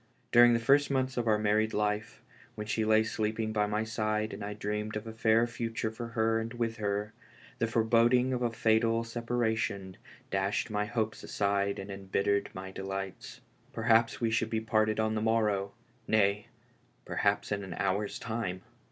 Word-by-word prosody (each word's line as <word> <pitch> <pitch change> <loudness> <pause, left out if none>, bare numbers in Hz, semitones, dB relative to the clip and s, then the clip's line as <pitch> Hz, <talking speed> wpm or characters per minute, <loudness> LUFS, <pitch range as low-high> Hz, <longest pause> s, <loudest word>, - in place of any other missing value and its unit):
During 120 0 +7
the 115 - +2
firro 135 +5 +5
months 130 -1 0
o' 120 - 0
our 110 -2 +3
married 110 +1 +1
life, 105 +1 -2 0.3
when 105 - -5
she 110 +1 0
lay 110 0 +4
sleeping 110 0 -2
by 105 -1 +1
my 105 +1 0
side 110 -1 -1
and - - -6
I 105 0 -4
dreamed 105 +1 -3
of 105 - -4
a 110 - -7
fair 115 +1 +3
future 115 -2 -3
for 115 +1 -6
her 110 0 +2
and 115 0 -3
vviih 115 -1 -3
lici, 105 0 -1 0.5
liic - - +2
loreboding 120 +3 +3
of 125 - -2
a 120 - +2
fatal 115 0 +2
separation 115 -5 -2 0.3
dashed 100 +4 0
my 105 0 0
hopes 110 -1 -2
aside 100 0 0
and 100 +1 -6
embittered 100 +1 0
my 95 0 -6
delights. 95 0 -6 0.3
Perhaps 115 0 +3
we 115 -2 0
should 115 0 +1
be 110 -1 0
parted 110 -1 +1
on 110 0 +1
the 110 - -1
morrow 105 -3 +1 0.2
— - - -35
nay, 100 0 +2 0.6
perhaps 100 +1 0
in 100 -1 -1
an 95 - -6
hour's 100 +2 -1
time. 110 -5 -4
110 Hz, 180 wpm, -30 LUFS, 105-115 Hz, 0.6 s, During